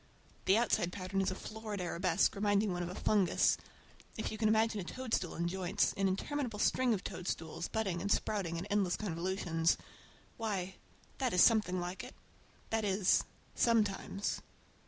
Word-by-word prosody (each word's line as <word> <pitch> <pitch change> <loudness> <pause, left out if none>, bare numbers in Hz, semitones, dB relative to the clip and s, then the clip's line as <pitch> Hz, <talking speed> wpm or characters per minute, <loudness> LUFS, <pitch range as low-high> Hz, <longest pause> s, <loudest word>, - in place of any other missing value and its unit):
The 195 +3 +5
outside 215 -6 +2
pattern 190 0 -2
is 190 - +1
a 185 - -3
florid 215 0 -6
arabesque, 175 -1 +1
reminding 205 -1 +2
one 175 - -2
of 175 - -3
a 180 - -6
fungus. 195 -5 +3 0.6
If 220 - -2
you 215 - -5
can 220 - +3
imagine 220 -1 +2
a - - -4
toadstool 225 -3 -2
in 170 +1 -1
joints, 180 0 0
an 195 -1 +2
interminable 235 +4 -2
string 240 +2 +3
of 190 - -6
toadstools, 165 -3 -4
budding 195 -6 -1
and 200 +2 -1
sprouting 185 -7 0
in 170 - -4
endless 200 -3 +1
convolutions,—why, 185 +2 -2 0.5
that 255 -4 0
is 180 - +6
something 210 -6 +4
like 180 +2 -4
it. - - -10 0.6
That 225 0 +1
is, 195 -1 +3 0.3
sometimes! 210 -3 +1
195 Hz, 155 wpm, -34 LUFS, 180-215 Hz, 0.6 s, is